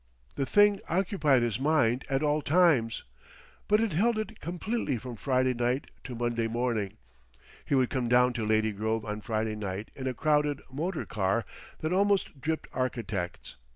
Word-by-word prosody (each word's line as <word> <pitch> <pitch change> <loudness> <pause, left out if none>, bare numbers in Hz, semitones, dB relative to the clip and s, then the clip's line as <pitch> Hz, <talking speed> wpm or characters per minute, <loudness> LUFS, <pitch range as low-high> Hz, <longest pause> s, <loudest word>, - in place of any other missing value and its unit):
The 135 - -2
thing 205 -1 +5
occupied 165 -8 +2
his 115 -1 -1
mind 135 -4 +2
at 135 +2 +1
all 150 0 +2
times, 145 -8 +3 0.6
but 210 +1 +4
it 225 -2 +1
held 220 +7 +2
it 215 0 -4
completely 175 - -2
from 125 +1 -7
Friday 130 +1 +1
night 120 +2 -1
to 125 - -6
Monday 120 -1 -1
morning. 115 -4 -1 0.7
He - - +1
would 130 -2 +2
come 125 -4 -1
down 125 +1 +4
to 115 -3 -2
Lady 110 0 +2
Grove 110 +2 -2
on 105 0 -4
Friday 110 -1 -2
night 100 0 -5
in 130 -1 -4
a 130 - -2
crowded 150 0 +1
motor 160 +6 -3
car 100 +2 0 0.4
that 155 +3 -1
almost 195 -7 +1
dripped 160 +3 -2
architects. 110 -8 -3
130 Hz, 165 wpm, -29 LUFS, 115-155 Hz, 0.7 s, thing